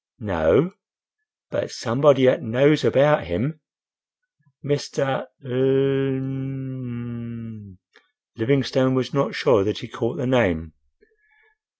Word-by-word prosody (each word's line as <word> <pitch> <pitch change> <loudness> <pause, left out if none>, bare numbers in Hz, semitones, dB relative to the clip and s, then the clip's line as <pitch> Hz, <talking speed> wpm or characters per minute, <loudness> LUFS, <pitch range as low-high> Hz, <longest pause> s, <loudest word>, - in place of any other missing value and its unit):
"No; 175 +6 +2 0.8
but - - -3
somebody 135 +2 +3
'at - - +3
knows 140 +6 +3
about 150 +3 +4
him." 120 - -3 1.1
"Mr. 140 -1 -2 0.2
L—m—m—" 130 -5 -3 0.6
Livingstone 130 +1 +1
was 130 -1 -2
not 140 -1 0
sure 95 - +3
that 105 +1 -2
he 120 - -8
caught 115 +1 -4
the 140 - -3
name. 90 -11 +1
130 Hz, 90 wpm, -22 LUFS, 115-135 Hz, 1.1 s, about